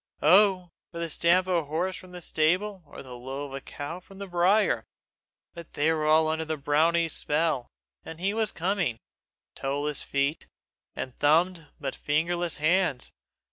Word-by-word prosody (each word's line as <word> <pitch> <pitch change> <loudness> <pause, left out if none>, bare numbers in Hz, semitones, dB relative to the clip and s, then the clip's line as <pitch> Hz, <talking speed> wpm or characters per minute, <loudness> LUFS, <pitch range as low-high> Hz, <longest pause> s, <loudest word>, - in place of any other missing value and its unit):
Oh! 185 +2 +5 0.2
for 170 - -9
the 170 -1 -3
stamp 175 +4 +3
of 185 - -1
a 165 -3 +1
horse 170 +6 -2
from 185 -1 -12
the 180 -1 -8
stable 185 +7 +1
or - - -10
the 125 -2 -9
low 135 +3 -6
of 135 - -10
a 135 - -5
cow 145 +7 -7
from 195 +1 -16
the 200 - -6
byre! 185 +4 +2 0.7
But 170 -1 -11
they 155 +3 +2
were 155 -1 -1
all 155 +1 +5
under 160 +1 0
the 160 0 -3
brownie's 160 +3 +2
spell, 150 -4 0 0.4
and 160 0 -9
he 195 +3 0
was 220 -2 0
coming 175 - -1 0.6
toeless 145 +2 -2
feet, 140 +3 -1 0.5
and 130 - -5
thumbed 165 +2 +3
but 135 -2 -4
fingerless 170 +3 0
hands! 155 -4 +1
165 Hz, 170 wpm, -27 LUFS, 145-180 Hz, 0.7 s, Oh